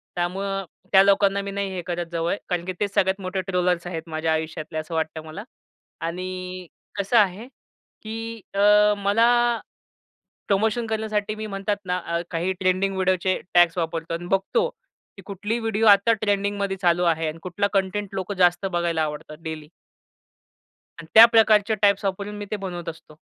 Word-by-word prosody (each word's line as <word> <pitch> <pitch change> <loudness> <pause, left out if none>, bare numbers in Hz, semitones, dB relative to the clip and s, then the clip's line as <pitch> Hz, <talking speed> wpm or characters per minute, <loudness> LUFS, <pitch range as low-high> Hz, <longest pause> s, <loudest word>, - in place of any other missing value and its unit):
त्यामुळं 195 +2 -2 0.3
त्या 190 - +8
लोकांना 200 0 +3
मी 200 0 -5
नाही 200 0 -2
हे 180 - -3
करत 175 0 -2
जवळ. 170 +2 -1
कारण 175 -1 -1
की 185 - -3
तेच 200 -1 -1
सगळ्यात 190 +1 +1
मोठे 185 0 -3
ट्रोलर्स 180 -2 0
आहेत 165 -1 -6
माझ्या 160 0 0
आयुष्यातले 160 0 -4
असं 155 +2 -5
वाटतं 160 0 -2
मला. 160 +6 -8 0.6
आणि 185 +1 -5 0.3
कसं 200 +4 +1
आहे 205 +2 +2 0.6
की 225 +1 -6
अ, - - 0 0.4
मला 205 +3 +3 1.2
प्रमोशन 220 +3 +1
करण्यासाठी 215 -1 -2
मी 215 0 -6
म्हणतात 195 0 -2
ना 180 0 0
अ, 170 0 -1
काही 175 +2 -1
ट्रेंडिंग 185 +1 +1
व्हिडिओचे 185 0 +1
टॅग्स 175 0 +5
वापरतो 165 0 -3
आणि 170 +1 -5
बघतो 195 - +1 0.5
की - - -12
कुठली 205 +3 -3
व्हिडिओ 225 -1 0
आता 205 +2 +6
ट्रेंडिंगमध्ये 200 -2 -1
चालू 175 0 +3
आहे. 165 -1 +1
आणि 155 +1 -6
कुठला 185 +3 -1
कंटेंट 200 +1 0
लोक 190 +1 -3
जास्त 180 0 +2
बघायला 170 -3 0
आवडतात 150 0 -5
डेली. 160 -2 -6 1.3
आणि 165 - -14
त्या 225 +1 +11
प्रकारच्या 220 -2 +4
टाइप्स 200 0 +3
वापरून 200 +2 -3
मी 205 - -5
ते - - 0
बनवत 180 -4 -5
असतो. 155 -1 -12
190 Hz, 160 wpm, -24 LUFS, 175-205 Hz, 1.3 s, त्या